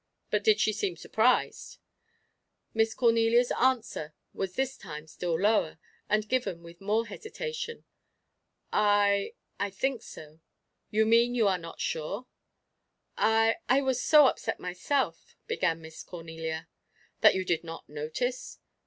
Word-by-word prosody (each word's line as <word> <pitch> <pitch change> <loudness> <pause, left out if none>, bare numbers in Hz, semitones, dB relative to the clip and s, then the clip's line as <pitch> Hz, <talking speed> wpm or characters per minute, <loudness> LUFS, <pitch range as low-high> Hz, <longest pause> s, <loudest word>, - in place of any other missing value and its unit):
But 210 -1 +1
did 215 0 +4
she 215 - +2
seem 200 -4 -2
surprised?" 225 +8 +1 1.0
Miss 225 0 +1
Cornelia's 230 0 +3
answer 230 -12 0 0.2
was 190 -1 -4
this 265 0 -1
time 150 -5 -9
still 165 +1 -3
lower, 205 -5 +2 0.3
and 215 0 +1
given 205 -10 -1
with 170 +1 -13
more 215 +3 +1
hesitation. 465 - -6 0.9
"I 205 -1 +3 0.2
I 200 +1 0
think 250 +5 -1
so." 155 +1 -12 0.5
"You 220 +1 +2
mean 235 +2 +4
you 225 -4 +3
are 185 -2 +2
not 165 -1 -10
sure?" 180 +10 -3 0.9
"I 225 +2 +3
I 265 +3 +5
was 260 -2 0
so 300 -2 +7
upset - - 0
myself" 180 +10 -2
began 165 - 0
Miss 160 0 -10
Cornelia. 160 -2 -6 0.5
"That - - +6
you 190 0 -1
did 175 -2 0
not 165 0 -9
notice?" 155 - -4
210 Hz, 135 wpm, -29 LUFS, 170-240 Hz, 1.0 s, so